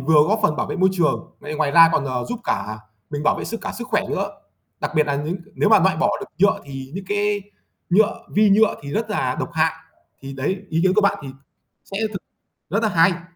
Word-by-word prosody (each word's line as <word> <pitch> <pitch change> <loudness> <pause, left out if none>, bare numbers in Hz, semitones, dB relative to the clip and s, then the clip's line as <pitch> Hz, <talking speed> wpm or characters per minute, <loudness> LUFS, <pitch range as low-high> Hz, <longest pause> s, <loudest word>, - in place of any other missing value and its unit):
vừa 150 +2 +5
góp 215 +2 +2
phần 155 -8 +2
bảo - - -1
vệ - - -4
môi 190 0 +4
trường, 175 -5 -1
vậy 150 +1 -6
ngoài 150 -2 +1
ra 165 +2 +8
còn, 145 - +1
ờ, 125 -2 -2
giúp 245 0 -4
cả 110 0 -2 0.3
mình 145 0 -3
bảo - - +2
vệ - - -4
sức 230 - -5
cả - - -4
sức 240 +1 -6
khỏe - - +1
nữa. - - -1 0.5
Đặc - - -2
biệt 155 - +4
là 145 - 0
những 150 +5 -2 0.2
nếu - - +2
mà 220 - +7
loại 190 0 +3
bỏ 205 - +2
được 200 - -6
nhựa 200 +3 +3
thì 135 -1 -8
những 195 +1 -5
cái 205 0 0 0.5
nhựa, 205 +4 +3
vi 210 0 +5
nhựa 215 +2 +4
thì 140 - -7
rất 220 +3 -2
là 130 -11 -1
độc - - -3
hại. 160 -1 +2 0.5
Thì 135 0 -7
đấy, 140 +9 -2
ý 165 0 +1
kiến 185 0 +3
của 215 - +4
bạn 200 0 +2
thì 140 - -7 0.6
sẽ 195 - -6
thực 195 - -6 0.5
rất 205 +5 0
là 215 - +2
hay. 170 -1 +3
180 Hz, 245 wpm, -22 LUFS, 150-205 Hz, 0.6 s, ra